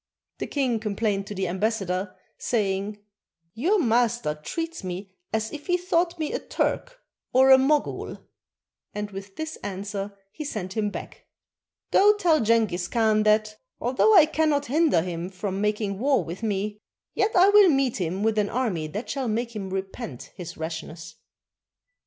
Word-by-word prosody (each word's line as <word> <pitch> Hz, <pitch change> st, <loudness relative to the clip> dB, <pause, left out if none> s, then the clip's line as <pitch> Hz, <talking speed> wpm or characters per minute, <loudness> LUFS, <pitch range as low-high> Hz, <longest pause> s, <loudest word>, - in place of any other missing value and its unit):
The -, -, -3 dB
king 255 Hz, -6 st, 0 dB
complained 205 Hz, -2 st, -1 dB
to 205 Hz, -, -6 dB
the 190 Hz, -1 st, -1 dB
ambassador, 190 Hz, -1 st, -1 dB, 0.2 s
saying, 205 Hz, -2 st, -1 dB, 0.5 s
"Your 350 Hz, -, +2 dB
master 240 Hz, -, +2 dB
treats 330 Hz, -, -5 dB
me 185 Hz, +1 st, -6 dB, 0.2 s
as 220 Hz, 0 st, -2 dB
if 295 Hz, -1 st, -8 dB
he 355 Hz, -1 st, +3 dB
thought 355 Hz, -1 st, 0 dB
me 310 Hz, -2 st, -2 dB
a -, -, -1 dB
Turk -, -, -2 dB, 0.3 s
or 265 Hz, +1 st, +6 dB
a 265 Hz, -, +10 dB
Mogul," 295 Hz, +3 st, 0 dB, 0.8 s
and 210 Hz, 0 st, -4 dB
with 195 Hz, 0 st, -9 dB
this 315 Hz, 0 st, -5 dB
answer 200 Hz, 0 st, -5 dB
he 305 Hz, -, -6 dB
sent 200 Hz, -9 st, -5 dB
him 210 Hz, -2 st, 0 dB
back, -, -, -9 dB, 0.6 s
"Go 415 Hz, +2 st, +6 dB
tell 335 Hz, -6 st, +3 dB
Jenghiz 215 Hz, -6 st, +2 dB
Khan 220 Hz, -1 st, +2 dB
that, 215 Hz, 0 st, +2 dB, 0.2 s
although 260 Hz, -, +3 dB
I 315 Hz, -, +9 dB
cannot 305 Hz, -2 st, +1 dB
hinder 290 Hz, -, +3 dB
him 175 Hz, 0 st, -4 dB
from 195 Hz, +1 st, -4 dB
making 210 Hz, -2 st, -1 dB
war 270 Hz, +2 st, +2 dB
with 170 Hz, +5 st, -7 dB
me, 210 Hz, -1 st, -2 dB, 0.3 s
yet 425 Hz, +2 st, 0 dB
I 370 Hz, +2 st, +7 dB
will 405 Hz, -2 st, +7 dB
meet 270 Hz, -5 st, +2 dB
him 185 Hz, +1 st, -2 dB
with 220 Hz, -1 st, +2 dB
an 205 Hz, -1 st, +1 dB
army 210 Hz, -11 st, -1 dB
that 210 Hz, +10 st, -5 dB
shall 270 Hz, -3 st, -2 dB
make 235 Hz, +1 st, -2 dB
him 195 Hz, -3 st, -4 dB
repent 190 Hz, -, -6 dB
his 175 Hz, -3 st, -8 dB
rashness." 160 Hz, 0 st, -6 dB
215 Hz, 160 wpm, -25 LUFS, 195-275 Hz, 0.8 s, a